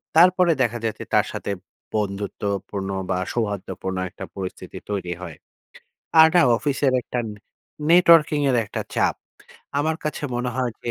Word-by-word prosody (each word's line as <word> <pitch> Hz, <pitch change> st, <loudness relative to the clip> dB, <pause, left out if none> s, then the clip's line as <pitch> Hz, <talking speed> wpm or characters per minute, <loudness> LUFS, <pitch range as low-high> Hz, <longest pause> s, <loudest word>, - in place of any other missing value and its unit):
তারপরে 180 Hz, +1 st, +6 dB
দেখা 120 Hz, 0 st, -1 dB
যাচ্ছে 110 Hz, -, -3 dB
তার -, -, +4 dB
সাথে -, -, -4 dB, 0.4 s
বন্ধুত্বপূর্ণ 100 Hz, -1 st, -3 dB, 0.2 s
বা, 90 Hz, -, +1 dB
সৌহার্দ্যপূর্ণ 100 Hz, -4 st, -3 dB
একটা -, -, -8 dB
পরিস্থিতি 95 Hz, -2 st, -6 dB
তৈরি 95 Hz, -4 st, -2 dB
হয়। 80 Hz, -4 st, -8 dB, 0.8 s
আর 160 Hz, -, +9 dB
না, 175 Hz, -, +7 dB, 0.2 s
অফিসের 140 Hz, 0 st, +1 dB
একটা 125 Hz, -, -4 dB, 0.7 s
নেটওয়ার্কিংয়ের 155 Hz, -6 st, +5 dB
একটা -, -, -4 dB
চাপ। -, -, +2 dB, 0.6 s
আমার 155 Hz, +2 st, 0 dB
কাছে 150 Hz, -, -3 dB
মনে 125 Hz, 0 st, -1 dB
হয় 125 Hz, -2 st, 0 dB
যে 120 Hz, -, -1 dB
120 Hz, 130 wpm, -23 LUFS, 100-150 Hz, 0.8 s, আর